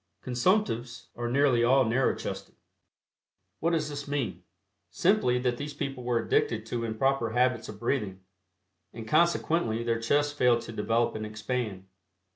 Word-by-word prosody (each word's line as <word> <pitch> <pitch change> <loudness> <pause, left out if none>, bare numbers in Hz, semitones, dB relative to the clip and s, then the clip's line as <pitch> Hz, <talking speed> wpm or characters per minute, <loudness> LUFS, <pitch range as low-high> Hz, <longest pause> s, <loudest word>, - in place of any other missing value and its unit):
Consumptives 125 - 0
are 120 0 -3
nearly 130 -2 +3
all 130 +2 +4
narrow 120 +4 +2
chested. - - -6 1.0
What 165 - +1
does 160 -3 0
this 145 -1 -6
mean? 120 -12 -2 0.5
Simply 180 -10 +2
that 125 -1 0
these 145 +1 -6
people 135 -3 -4
were 120 -1 +1
addicted 110 -1 0
to 115 +1 -3
improper 115 +1 0
habits 125 -2 +1
of 105 -1 -9
breathing, 105 -6 -2 0.7
and 110 -1 -8
consequently 165 -6 +2
their 115 -1 -1
chests 145 +5 +1
failed 125 -4 +3
to - - -8
develop 115 +2 0
and 110 - -5
expand. 110 -2 -4
120 Hz, 145 wpm, -28 LUFS, 115-140 Hz, 1.0 s, all